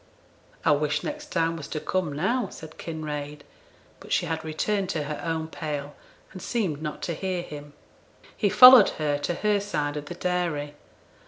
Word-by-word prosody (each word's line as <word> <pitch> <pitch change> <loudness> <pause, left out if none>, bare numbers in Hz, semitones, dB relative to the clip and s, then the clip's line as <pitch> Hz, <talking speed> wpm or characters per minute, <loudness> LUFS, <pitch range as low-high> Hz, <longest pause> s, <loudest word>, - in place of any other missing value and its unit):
'I - - +5
wish 145 0 +1
next 300 0 -5
time 165 - 0
was 155 -3 -7
to 155 - -4
come 180 -1 -1
now,' 195 - 0
said 160 0 -11
Kinraid; 150 -2 -5 0.6
but - - -13
she - - +2
had 160 0 -3
returned 190 +5 -1
to 155 -5 -1
her 150 0 -5
own 160 -1 -2
pail, 145 -3 -5 0.4
and 185 - -8
seemed 185 -11 -2
not 150 -1 -5
to 170 - -2
hear 180 +1 -3
him. 145 -2 -9 0.6
He 205 - +1
followed 250 -1 +10
her 145 -2 0
to 155 +4 -2
her 210 +1 +1
side 150 -7 -2
of 145 - -5
the 175 - -7
dairy. 170 -5 -2
160 Hz, 175 wpm, -26 LUFS, 150-185 Hz, 0.6 s, followed